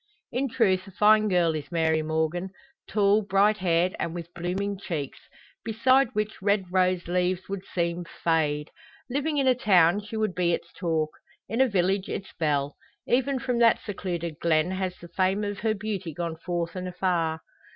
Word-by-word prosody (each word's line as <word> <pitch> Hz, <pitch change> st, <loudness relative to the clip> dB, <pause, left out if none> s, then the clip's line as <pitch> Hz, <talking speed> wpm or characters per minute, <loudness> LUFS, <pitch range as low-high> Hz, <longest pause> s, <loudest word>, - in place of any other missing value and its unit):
In 265 Hz, +3 st, -1 dB
truth 200 Hz, -6 st, +1 dB
a -, -, -10 dB
fine 215 Hz, +2 st, +5 dB
girl 175 Hz, -4 st, +2 dB
is 155 Hz, +1 st, -6 dB
Mary 160 Hz, -2 st, +2 dB
Morgan, 160 Hz, +4 st, -1 dB, 0.4 s
tall, 205 Hz, 0 st, +3 dB
bright 200 Hz, +1 st, +3 dB
haired, 180 Hz, -1 st, +1 dB
and 170 Hz, -, -2 dB
with 170 Hz, 0 st, -7 dB
blooming 190 Hz, +3 st, -3 dB
cheeks, 150 Hz, -8 st, -4 dB, 0.4 s
beside 255 Hz, +3 st, +3 dB
which 210 Hz, -1 st, -2 dB
red 200 Hz, 0 st, +2 dB
rose 185 Hz, -1 st, +2 dB
leaves 180 Hz, +1 st, 0 dB
would 195 Hz, -1 st, -5 dB
seem 170 Hz, 0 st, -1 dB, 0.2 s
fade. 150 Hz, -2 st, +1 dB, 0.4 s
Living 290 Hz, +3 st, -1 dB
in 275 Hz, -, +2 dB
a 255 Hz, -, +6 dB
town 200 Hz, -6 st, +4 dB
she 210 Hz, +2 st, -6 dB
would 215 Hz, -3 st, 0 dB
be 175 Hz, -1 st, +1 dB
its -, -, -4 dB
talk; 160 Hz, -3 st, -1 dB, 0.4 s
in 225 Hz, +6 st, 0 dB
a 265 Hz, -, +5 dB
village 190 Hz, -2 st, 0 dB
its 190 Hz, -, -5 dB
belle. 145 Hz, -3 st, 0 dB, 0.3 s
Even 265 Hz, +2 st, +2 dB
from 250 Hz, -1 st, -1 dB
that 230 Hz, -1 st, +5 dB
secluded 170 Hz, -5 st, -4 dB
glen 165 Hz, +1 st, +2 dB
has 185 Hz, -1 st, -3 dB
the 175 Hz, -, -11 dB
fame 190 Hz, +4 st, 0 dB
of 205 Hz, -1 st, -3 dB
her 220 Hz, 0 st, 0 dB
beauty 195 Hz, -6 st, -4 dB
gone 170 Hz, -1 st, -3 dB
forth 170 Hz, 0 st, -3 dB
and 185 Hz, 0 st, -4 dB
afar. 175 Hz, -3 st, -1 dB
185 Hz, 175 wpm, -26 LUFS, 170-210 Hz, 0.4 s, a